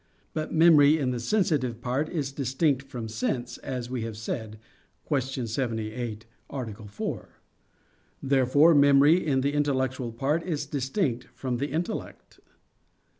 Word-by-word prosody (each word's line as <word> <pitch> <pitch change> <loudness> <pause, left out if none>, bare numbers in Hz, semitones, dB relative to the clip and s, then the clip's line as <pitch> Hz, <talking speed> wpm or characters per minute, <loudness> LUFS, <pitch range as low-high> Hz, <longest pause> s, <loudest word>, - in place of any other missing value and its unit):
But 155 0 -3
memory 160 -2 +6
in 135 -4 0
the 125 - -3
sensitive 130 - 0
part 130 +6 -1
is 145 -6 -2
distinct 135 +1 0
from 120 -4 -5
sense, 120 +2 -3
as 125 -2 -5
we 125 -1 -3
have 110 -1 -5
said 110 0 -5 0.5
(Q. 135 -3 -1
78, 115 -1 -3 0.2
A. 110 -5 -6
4). 105 +1 -5 0.9
Therefore 140 +4 +4
memory 145 +4 +6
in 135 -4 +1
the 140 +2 0
intellectual 130 -4 0
part 140 +8 0
is 155 -4 -3
distinct 135 - -1
from 125 -2 -2
the 140 +4 -1
intellect. 170 +8 -5
130 Hz, 130 wpm, -27 LUFS, 120-145 Hz, 0.9 s, memory